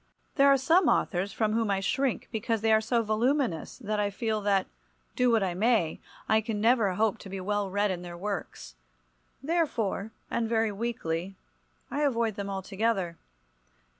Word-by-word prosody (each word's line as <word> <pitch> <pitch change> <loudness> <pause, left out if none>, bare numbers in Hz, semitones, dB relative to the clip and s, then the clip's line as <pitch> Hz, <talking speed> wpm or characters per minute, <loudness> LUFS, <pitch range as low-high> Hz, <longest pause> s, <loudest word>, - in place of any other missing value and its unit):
There 275 -1 +5
are 275 0 +6
some 325 +6 +3
authors 190 +1 +1
from 215 0 0
whom 225 -1 +1
I 195 -1 +1
shrink 265 +6 -1
because 225 -1 -1
they 220 0 +3
are 220 - +5
so 230 +1 +1
voluminous 225 - 0
that 215 -4 -3
I 205 -1 +1
feel 215 +1 -2
that, 200 -2 +2 0.5
do 250 0 +3
what 225 -3 +3
I 185 -2 -1
may, 205 -4 +1 0.3
I 220 0 +4
can 220 -1 -3
never 225 -3 +3
hope 220 +2 +1
to 195 - -10
be 195 0 -5
well 205 +1 -1
read 205 +1 +1
in 175 -1 -4
their 175 -1 -8
works. 195 - -5 0.7
Therefore, 270 - 0 0.2
and 230 -1 0
very 225 -1 +2
weakly, 195 -5 -3 0.6
I 290 - -1
avoid 235 -6 +1
them 200 -1 -4
altogether. 195 -2 -1
215 Hz, 170 wpm, -28 LUFS, 195-235 Hz, 0.7 s, are